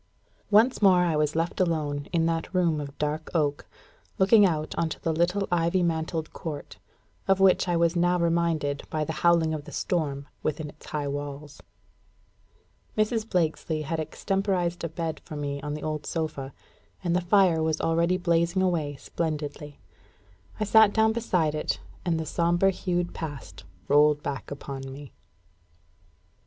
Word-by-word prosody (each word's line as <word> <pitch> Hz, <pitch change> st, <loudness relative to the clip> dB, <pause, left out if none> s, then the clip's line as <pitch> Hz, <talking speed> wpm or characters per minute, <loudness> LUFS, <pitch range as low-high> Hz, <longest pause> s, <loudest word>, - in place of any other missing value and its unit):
_ -, -, -40 dB, 0.5 s
Once 220 Hz, +5 st, +4 dB
more 185 Hz, -3 st, +6 dB
I 170 Hz, -3 st, +1 dB
was 150 Hz, 0 st, +1 dB
left 165 Hz, +4 st, -1 dB
alone 150 Hz, -5 st, 0 dB
in 165 Hz, -2 st, +2 dB
that 165 Hz, 0 st, -1 dB
room 170 Hz, -4 st, +2 dB
of 140 Hz, -1 st, -8 dB
dark 150 Hz, +1 st, -2 dB
oak, 145 Hz, -3 st, 0 dB, 0.5 s
looking 200 Hz, +1 st, +6 dB
out 155 Hz, -3 st, -2 dB
on 165 Hz, -, 0 dB
the 165 Hz, -, +1 dB
little 180 Hz, +5 st, +1 dB
ivy 175 Hz, +1 st, +2 dB
mantled 160 Hz, -1 st, -2 dB
court, 145 Hz, -10 st, -7 dB, 0.5 s
of 195 Hz, 0 st, +3 dB
which 190 Hz, -1 st, +4 dB
I 175 Hz, -1 st, +1 dB
was 170 Hz, +1 st, +2 dB
now 175 Hz, +1 st, +3 dB
reminded 165 Hz, -4 st, 0 dB
by 155 Hz, -1 st, -1 dB
the 160 Hz, -, -3 dB
howling 170 Hz, -2 st, +4 dB
of 150 Hz, -2 st, -5 dB
the -, -, -10 dB
storm 145 Hz, -5 st, -2 dB
within 155 Hz, 0 st, -2 dB
its 150 Hz, -, -16 dB
high 150 Hz, -2 st, -3 dB
walls. 145 Hz, +1 st, -6 dB, 1.4 s
Mrs. 215 Hz, +1 st, 0 dB
Blakesley 160 Hz, -2 st, 0 dB
had 160 Hz, +3 st, -3 dB
extemporised 180 Hz, +1 st, -1 dB
a 165 Hz, -, -2 dB
bed 165 Hz, 0 st, -4 dB
for 155 Hz, -, -9 dB
me 140 Hz, -1 st, -3 dB
on 150 Hz, +1 st, -4 dB
the 150 Hz, -, -7 dB
old 155 Hz, -1 st, -3 dB
sofa; 155 Hz, -5 st, -3 dB, 0.5 s
and 175 Hz, -1 st, +1 dB
the 180 Hz, -, +2 dB
fire 180 Hz, -2 st, +4 dB
was 160 Hz, -1 st, 0 dB
already 170 Hz, +2 st, +2 dB
blazing 170 Hz, +1 st, +1 dB
away 160 Hz, -6 st, 0 dB
splendidly. 150 Hz, -1 st, -4 dB, 0.8 s
I -, -, +1 dB
sat 215 Hz, 0 st, +6 dB
down 220 Hz, 0 st, +3 dB
beside 180 Hz, -9 st, 0 dB
it, 155 Hz, -, -2 dB, 0.2 s
and 170 Hz, -3 st, 0 dB
the 160 Hz, -, -3 dB
sombre 175 Hz, +4 st, +2 dB
hued 175 Hz, -1 st, -2 dB
Past 145 Hz, -, -7 dB, 0.2 s
rolled 150 Hz, 0 st, +4 dB
back 140 Hz, -2 st, -4 dB
upon 135 Hz, -1 st, -7 dB
me. 140 Hz, 0 st, -10 dB
165 Hz, 160 wpm, -27 LUFS, 150-175 Hz, 1.4 s, more